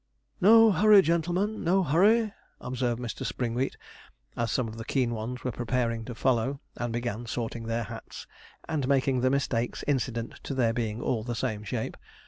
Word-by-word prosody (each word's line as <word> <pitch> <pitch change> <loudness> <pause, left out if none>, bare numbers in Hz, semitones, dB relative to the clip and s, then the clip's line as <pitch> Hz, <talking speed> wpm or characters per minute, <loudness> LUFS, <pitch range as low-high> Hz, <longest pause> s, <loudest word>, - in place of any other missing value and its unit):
'No 225 +3 +8
hurry, 205 +2 +6
gentlemen 175 +6 0
no 190 +3 +3
hurry,' 205 - +3 0.3
observed 125 -1 -2
Mr. 120 -2 -5
Springwheat, 125 +2 -2 0.6
as 115 -1 -1
some 130 -3 0
of 110 0 -8
the - - -4
keen 120 0 0
ones 115 +3 -5
were 125 - -1
preparing 115 -1 -1
to 120 - -7
follow, 130 +2 +1 0.2
and 120 -1 -3
began 120 0 -3
sorting 115 0 -4
their 115 +1 -1
hats, 105 - -9 0.4
and 150 -5 -1
making 135 -2 +2
the 130 - +3
mistakes 130 -3 -1
incident 125 -4 -2
to 135 - -5
their 120 -3 +2
being 115 -1 -2
all 115 -4 0
the 120 0 -3
same 110 -1 -2
shape. 110 +2 -4
125 Hz, 170 wpm, -28 LUFS, 115-145 Hz, 0.6 s, No